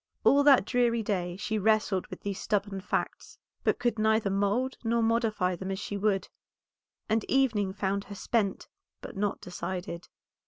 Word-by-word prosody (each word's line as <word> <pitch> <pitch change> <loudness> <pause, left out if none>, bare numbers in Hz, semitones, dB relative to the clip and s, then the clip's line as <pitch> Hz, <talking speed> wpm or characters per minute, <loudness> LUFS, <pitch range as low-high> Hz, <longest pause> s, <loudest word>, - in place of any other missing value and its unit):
All 280 - +6
that 280 -7 +6
dreary 235 -1 +2
day 180 -4 -2
she 215 +2 -2
wrestled 215 -2 +2
with - - -9
these 200 -1 -4
stubborn 205 -2 -1
facts, 185 - -3 0.3
but - - +2
could 240 -2 0
neither 220 -2 +2
mould 205 +7 +1
nor 230 0 +1
modify 225 -5 +1
them 190 +2 -6
as 190 - -2
she 205 +1 -5
would, 200 -1 0 0.8
and 220 0 +1
evening 225 -8 +2
found 195 +1 -2
her 200 - -9
spent, 200 0 -1 0.3
but - - -9
not 205 +1 -1
decided. 180 -1 -5
205 Hz, 160 wpm, -29 LUFS, 195-225 Hz, 0.8 s, All